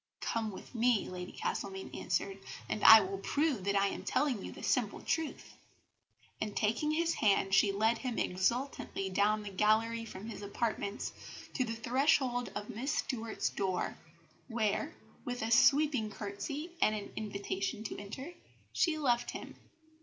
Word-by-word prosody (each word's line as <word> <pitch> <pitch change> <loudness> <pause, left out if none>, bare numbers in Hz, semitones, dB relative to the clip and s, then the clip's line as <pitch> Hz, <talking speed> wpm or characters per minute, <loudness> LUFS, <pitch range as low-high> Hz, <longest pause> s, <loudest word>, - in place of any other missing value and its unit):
"Come 225 -1 -1
with 195 - -10
me," 235 -2 +2
Lady 180 0 -6
Castlemaine 190 -1 -4
answered, 195 0 -2 0.3
"and 215 - -3
I 220 0 +11
will 195 0 -4
prove 280 - 0
that 200 0 +1
I 200 0 +3
am - - -6
telling 260 -7 0
you - - -6
the - - -10
simple 235 -6 +1
truth;" 325 -2 -2 0.9
and 210 -1 -3
taking 230 +8 +1
his 335 +2 +1
hand 195 -2 +2
she 200 +1 +5
led 220 +3 +2
him 250 -3 -3
exultantly 195 +1 -1
down 210 +2 +2
the 205 - -6
gallery 220 +3 +2
from 200 -2 -8
his 225 - -7
apartments 205 0 -2 0.4
to 255 - +1
the 230 -1 -3
threshold 245 0 +2
of 210 - -4
Miss 255 +7 -2
Stuart's 230 -7 -1
door, 190 -2 -1 0.5
where, 235 +6 -1 0.3
with 245 -2 -3
a 225 - -2
sweeping 270 -1 +5
curtsy 220 - -5
and 215 - +4
an 205 -1 -6
invitation 200 -1 -3
to 220 - -5
enter, 260 - -7 0.4
she 330 -3 +2
left 245 -5 +1
him. - - -7
220 Hz, 155 wpm, -33 LUFS, 200-255 Hz, 0.9 s, I